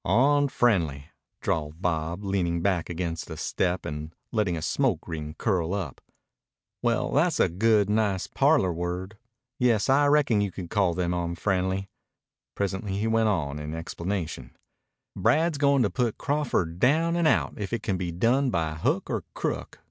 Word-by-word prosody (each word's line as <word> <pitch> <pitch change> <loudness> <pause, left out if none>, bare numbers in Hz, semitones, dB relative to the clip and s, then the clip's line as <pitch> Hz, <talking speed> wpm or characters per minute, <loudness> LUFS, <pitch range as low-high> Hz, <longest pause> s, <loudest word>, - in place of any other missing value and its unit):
"Onfriendly!" 115 - +2 0.3
drawled 80 0 -2
Bob, 85 +1 -2
leaning 90 -4 0
back 95 -4 0
against 85 -1 -3
the - - -7
step 90 0 -1
and 75 +2 -6 0.2
letting 105 -7 0
a - - -4
smoke 120 - 0
ring 75 -2 -5
curl 95 -4 0
up. 90 -9 -5 0.8
"Well, 120 -1 +1
tha's 155 +3 +2
a - - +5
good, 105 +3 +3
nice 105 -3 +1
parlor 140 - +2
word. 90 +5 -4 0.4
Yes, 120 -2 +2
I 145 +2 +5
reckon 145 -7 +3
you 100 - 0
could 90 -2 -8
call 95 -5 +2
them 90 -1 0
onfriendly." 95 +2 -1 0.7
Presently 100 0 -2
he 105 - -1
went 115 -1 +2
on, 75 -7 -1
in 75 +1 -5
explanation: 85 -5 -4 0.6
"Brad's 160 -1 +2
goin' 140 -2 +4
to 105 - +2
put 120 -4 -1
Crawford 120 - -1
down 160 - +3
and 170 -2 +2
out - - +2
if 100 -2 -4
it 115 -2 -2
can 95 -3 0
be 90 -2 -3
done 120 +10 +2
by 80 -7 -1
hook 80 - 0
or - - -2
crook. - - -3
95 Hz, 160 wpm, -26 LUFS, 85-120 Hz, 0.8 s, a